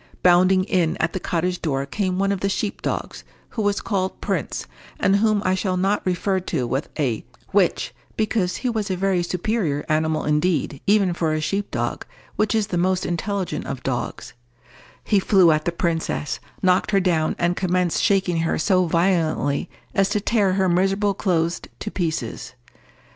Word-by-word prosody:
Bounding 185 +1 +5
in 180 -4 +1
at 160 +1 0
the 185 - -2
cottage 180 +1 -1
door 140 -4 -1
came 185 +4 -2
one 195 +1 +1
of 200 - -1
the 195 - 0
sheep 200 +1 -2
dogs, - - -3 0.3
who 225 - -4
was 205 -1 +1
called 190 -3 -2
Prince, - - -2 0.3
and 195 +1 +3
whom 215 -1 +2
I 185 - +3
shall 185 -1 -1
not 195 +3 +1
refer 185 +2 +1
to 165 -8 -2
with 135 +4 -2
a 130 -8 0 0.3
which, 195 -3 +1 0.2
because 215 -4 0
he - - +4
was 215 -3 -2
a 190 - 0
very 190 -1 +1
superior 175 -4 -1
animal 155 0 +1
indeed, 150 -2 0
even 200 -3 +4
for 165 -2 0
a - - 0
sheep 195 +6 -2
dog, - - -2 0.3
which 215 +1 +1
is 220 -2 +2
the 180 -4 -2
most 185 +1 +1
intelligent 190 +2 -2
of 135 -2 -5
dogs: 125 -3 -3 0.7
he 205 - +3
flew 185 -3 +5
at 155 0 +1
the 175 - +1
princess, 165 -3 -2 0.2
knocked 185 0 +3
her 200 - +3
down, 170 -4 +1
and 175 +1 +1
commenced 180 -2 +1
shaking 190 -4 +2
her 165 0 0
so 185 +1 +2
violently 165 -4 +1 0.2
as 195 0 +2
to 210 0 +1
tear 205 -2 +2
her 190 0 +2
miserable 195 +3 +2
clothes 170 -4 0 0.2
to 210 - -5
pieces. 160 - -3
185 Hz, 175 wpm, -22 LUFS, 165-195 Hz, 0.7 s, Bounding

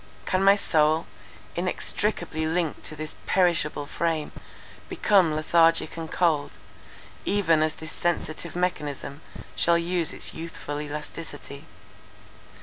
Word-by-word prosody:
Can 185 +1 +1
my 195 +1 +7
soul, 155 -4 +2 0.5
inextricably 175 -2 -1
linked 165 -1 -1
to 155 - -5
this 155 +1 -7
perishable 165 -5 +2
frame, 160 0 -1 0.6
become 185 -7 +3
lethargic 165 +1 +3
and 165 -1 -6
cold, 160 -5 +1 0.7
even 165 -6 +3
as 155 0 +1
this 160 -1 -9
sensitive 170 -1 -2
mechanism 150 -5 -2 0.3
shall 170 0 +4
lose 170 -1 0
its - - -6
youthful 150 -3 -5
elasticity? 150 -1 -7
165 Hz, 110 wpm, -26 LUFS, 155-175 Hz, 0.7 s, my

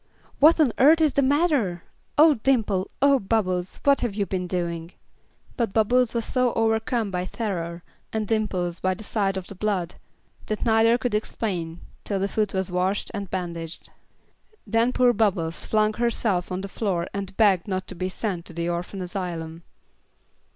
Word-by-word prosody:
"What 315 +4 +6
on 275 -8 +4
earth 310 +5 +7
is 310 -3 +3
the 280 - +3
matter? 275 - +1 0.3
Oh, 310 +1 +7
Dimple! 220 -7 +1
Oh, 280 -1 +5
Bubbles! 190 -4 -1
What 280 -1 +4
have 230 -5 -2
you 205 -1 0
been 185 -2 -3
doing?" 170 -1 -3 0.6
But 230 -6 -1
Bubbles 240 +2 +2
was 230 - 0
so 250 -2 +1
overcome 225 -1 0
by 180 0 -2
terror, 175 -5 -4 0.3
and 215 -1 -2
Dimples 190 -6 -1
by 185 0 0
the 215 - -10
sight 200 -3 0
of 190 - -5
the - - -9
blood, 190 -3 -2 0.5
that 215 - -2
neither 225 +1 +4
could 245 -2 -2
explain 180 -6 -3 0.2
till 200 -2 -2
the 195 - 0
foot 210 0 -1
was 190 -1 -2
washed 185 +3 -1
and 200 -2 -5
bandaged. 170 -3 -5 0.7
Then 225 +3 +2
poor 250 -1 +4
Bubbles 185 -7 0
flung 215 0 +2
herself 215 -6 0
on 185 +1 -2
the 195 - -5
floor 190 -4 -2
and 195 -1 -5
begged 200 -4 +4
not 185 -1 -2
to - - -4
be 185 +2 -3
sent 185 -3 -3
to - - -10
the 170 +1 -2
orphan 175 +2 -3
asylum. 170 -3 -5
200 Hz, 170 wpm, -25 LUFS, 180-225 Hz, 0.7 s, earth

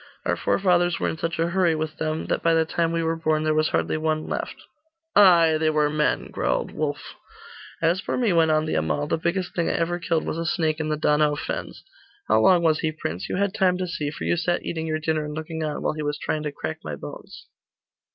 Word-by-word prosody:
Our - - +1
forefathers 175 -3 +2
were - - 0
in 160 - -5
such 165 +1 -2
a 165 +1 +1
hurry 175 -2 +2
with 155 0 -4
them, 155 0 -2
that - - -1
by 165 0 +3
the 160 0 +3
time 165 +1 0
we 165 0 0
were 165 0 0
born, 155 -1 0
there 155 0 +2
was 155 0 +2
hardly - - 0
one 155 0 -1
left.' - - -5 0.5
'Ay, 170 -5 +6
they 160 0 +2
were 150 -1 +2
men,' 150 0 0
growled - - -1
Wulf. 145 -2 -4 0.7
'As 170 +3 +2
for - - -2
me,' 235 -7 +2
went 165 -1 +4
on 155 0 +2
the 155 - -2
Amal, 80 - 0
'the 150 - -1
biggest 175 +2 -1
thing 170 - 0
I - - 0
ever 175 +1 -1
killed 165 -2 0
was 165 - -3
a 165 - -2
snake 160 -3 0
in 155 -1 -2
the 155 - 0
Donau 150 0 +2
fens. - - -5 0.4
How 110 - +4
long 175 +7 +5
was 155 -2 +3
he, 160 - 0
prince? 90 - -5
You - - -2
had 200 +1 0
time 185 -4 +2
to 185 - -2
see, 155 -4 -3
for 145 - -7
you 175 - +1
sat 175 +1 -1
eating 160 -1 -3
your 155 0 0
dinner 155 0 -1
and 150 0 -6
looking 160 0 -4
on, 150 -1 -3
while - - 0
he 155 - -5
was 145 0 -2
trying 155 - -2
to 150 -1 -3
crack 80 - -5
my - - -5
bones. - - -10
160 Hz, 245 wpm, -24 LUFS, 155-170 Hz, 0.7 s, Ay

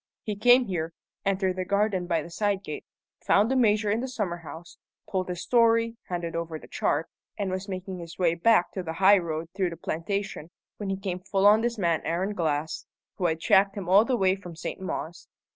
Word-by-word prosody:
He 210 -3 -3
came 245 +4 +5
here, 170 -5 -3 0.3
entered 190 -1 +1
the 185 - -1
garden 200 -1 0
by 165 -3 0
the 170 - -11
side 200 +1 0
gate, 150 -5 -6 0.4
found 210 +5 +3
the - - +2
Major 215 -4 +3
in 220 - +1
the 260 - -3
summer 205 -9 -3
house, 165 0 -11 0.3
told 185 -1 -1
his 180 -1 -4
story, 230 -1 +3
handed 170 -2 -3
over 165 -1 -3
the - - -14
chart, 155 +3 0 0.3
and 200 -2 -2
was 190 +2 -4
making 185 0 -5
his 170 -1 -9
way 175 -3 +3
back 180 +2 +3
to 190 - -4
the 160 -2 -5
high 195 +3 +6
road 165 -1 -4
through 190 -2 +1
the 170 - -8
plantation, 175 +1 -3 0.3
when 205 -2 -4
he 195 - -1
came 190 -2 -4
full 195 +1 0
on 210 +2 +7
this 235 0 -1
man 170 -5 +1
Aaron 185 +5 -1
Glass, 155 -4 -2 0.3
who 180 - +1
had 160 -1 -1
tracked 195 +4 +3
him 190 -3 -5
all 195 +4 +6
the 245 +1 0
way 190 -2 +3
from 180 -4 -10
St. 170 +3 -6
Mawes. 175 -2 -5
185 Hz, 215 wpm, -27 LUFS, 170-205 Hz, 0.4 s, on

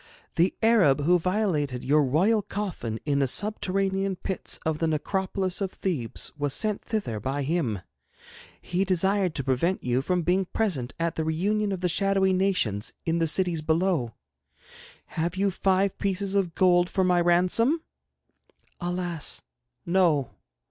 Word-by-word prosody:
The 175 +3 +2
Arab 190 -12 +4
who 175 +4 +3
violated 165 - -1
your 150 +3 +4
royal 185 - +2
coffin 190 - -4
in 145 -2 +1
the 135 - +2
subterranean 195 - 0
pits 185 0 -3
of 155 -1 -1
the 165 - +1
necropolis 190 +4 -1
of 190 -1 -1
Thebes 145 -12 -3
was 145 -2 -1
sent 215 -2 -1
thither 160 - -3
by 135 +6 -2
him. 135 - -1 0.8
He 180 +2 -1
desired 190 -1 +1
to 140 - -1
prevent 135 +9 0
you 125 +1 +1
from 180 +4 0
being 185 +3 +1
present 170 - -2
at 165 0 0
the 160 - -2
reunion 200 +7 0
of 190 -2 -3
the 180 - +1
shadowy 195 +1 +2
nations 180 - 0
in 165 0 0
the 165 - +2
cities 175 0 +2
below. 160 - 0 1.0
Have 170 +2 -1
you 195 +1 +1
five 190 +1 +1
pieces 195 0 -1
of 190 -5 0
gold 175 -1 +4
for 190 - +1
my 180 -1 +3
ransom?' 185 - +3 1.0
'Alas, 175 -3 -3 0.4
no! 170 -7 +2
180 Hz, 150 wpm, -26 LUFS, 155-195 Hz, 1.0 s, Arab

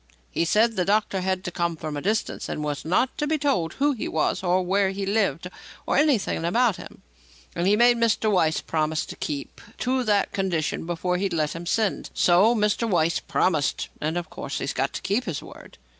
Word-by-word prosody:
He 170 - 0
said 220 +6 +3
the 180 - +2
doctor 200 0 +1
was 185 0 0
to 180 - -4
come 170 -1 -1
from 155 -1 -5
a 145 - -3
distance 215 +5 -2
and 150 - -3
was 145 -1 -3
not 190 +10 +1
to 295 - 0
be 310 +1 +1
told 190 - 0
who 290 +2 +2
he 250 - -4
was 160 - 0
or 185 0 +1
where 195 +2 +2
he 195 +1 -3
lived 195 -5 0 0.4
or - - 0
anything 275 - +2
about 225 +5 +2
him; - - -12 0.5
and 175 +2 0
he 205 - +5
made 240 +2 +5
Mr. 225 -2 +2
Weiss 160 -5 +2
promise 155 -1 -1
to - - -8
keep 145 -2 -5 0.2
to 255 +1 0
that 205 -2 +2
condition 170 -5 -1
before 180 +1 -1
he'd 195 0 -1
let 155 -2 -1
him 170 +1 -7
send. 215 +1 0
So 190 +7 +4
Mr. 210 +1 +1
Weiss 170 -3 +2
promised, 155 -6 0
and, 155 +3 -1
of 170 -2 -5
course, 140 - -5
he's - - -3
got 135 +1 -1
to - - -6
keep 215 +6 0
his 165 -6 -4
word." - - -13
185 Hz, 210 wpm, -25 LUFS, 165-215 Hz, 0.5 s, he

